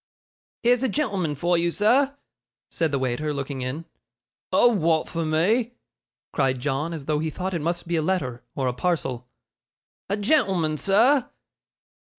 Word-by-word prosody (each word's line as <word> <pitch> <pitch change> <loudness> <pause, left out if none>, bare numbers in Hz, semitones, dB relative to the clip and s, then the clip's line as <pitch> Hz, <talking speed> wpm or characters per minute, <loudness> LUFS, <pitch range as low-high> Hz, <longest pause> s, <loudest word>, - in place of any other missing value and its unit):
'Here's 245 +1 +4
a 265 - +1
gen'l'man 195 - -1
for 170 +4 +1
you, 170 0 +1
sir,' 260 +10 +2 0.5
said 165 -3 0
the 140 - +1
waiter, 130 +4 -1
looking 140 -2 -4
in. 130 +6 -4 0.7
'A 245 - +5
wa'at 165 -7 +1
for 165 -1 -3
me?' 205 +10 +1 0.6
cried 135 -3 +1
John, 150 +4 -1
as 155 -5 -6
though 150 0 0
he 160 +1 -1
thought 185 +4 -4
it 170 - -1
must 170 +2 -2
be 170 0 0
a - - +2
letter, 150 -9 -1
or 135 -2 -1
a 125 - 0
parcel. 130 -5 -2 0.8
'A 200 - 0
gen'l'man, 195 - +2
sir. 235 - +3
165 Hz, 160 wpm, -24 LUFS, 145-200 Hz, 0.8 s, A